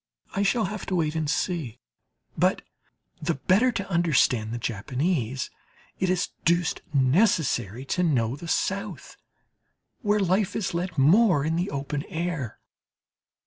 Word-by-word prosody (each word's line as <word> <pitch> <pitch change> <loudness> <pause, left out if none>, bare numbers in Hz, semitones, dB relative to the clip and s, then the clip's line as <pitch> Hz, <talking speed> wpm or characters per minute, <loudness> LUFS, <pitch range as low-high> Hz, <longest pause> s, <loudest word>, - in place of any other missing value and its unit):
I 200 - +1
shall 220 +3 +2
have 205 +1 -5
to 185 - -1
wait 155 -3 +1
and 160 -2 -1
see; 150 - -2 0.6
but - - +2 0.6
the - - 0
better 195 - +3
to 200 -3 -3
understand 150 - +2
the 120 - -3
Japanese 125 - -2 0.5
it 185 - +1
is 180 -1 +1
deuced 170 +1 +1
necessary 135 - +2
to 180 - -1
know 130 -8 +1
the 170 +4 -9
South, 190 -3 -2 0.9
where 210 0 +2
life 195 +1 +1
is 205 - -2
led 175 0 -3
more 165 - +5
in 160 +1 0
the 175 +4 -1
open 140 +1 -3
air. 165 -8 -3
165 Hz, 140 wpm, -26 LUFS, 135-190 Hz, 0.9 s, more